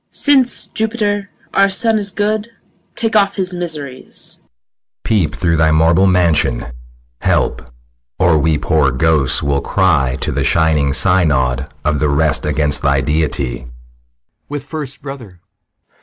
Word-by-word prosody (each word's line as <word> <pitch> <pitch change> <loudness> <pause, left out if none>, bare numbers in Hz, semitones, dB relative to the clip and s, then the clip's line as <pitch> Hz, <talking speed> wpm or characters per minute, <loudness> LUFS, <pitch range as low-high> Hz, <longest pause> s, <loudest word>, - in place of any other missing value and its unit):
MOTHER. - - -53
Since, 270 -4 +1
Jupiter, 210 -2 -2 0.2
our 195 0 +4
son 220 +2 +1
is 200 -1 -3
good, 210 +2 -2 0.5
Take 225 -2 -2
off 200 -2 +3
his 185 -2 -2
miseries. 150 -7 -7
SICILIUS. - - -8 0.6
Peep 90 -9 0
through 85 -3 0
thy 80 0 +3
marble 80 +4 +3
mansion. 80 -9 +2 0.6
Help! - - -1 0.5
Or 85 -4 +3
we 75 +1 +1
poor 75 -1 +1
ghosts 70 0 +2
will 70 -1 0
cry 70 -9 +1
To - - 0
th' 70 +1 -1
shining 75 0 +2
synod 70 -7 +2 0.2
of 75 -1 0
the 75 - +1
rest 75 +1 +1
Against 75 -1 +1
thy 70 -1 +1
deity. 70 -5 -1
80 Hz, 125 wpm, -16 LUFS, -, 0.6 s, our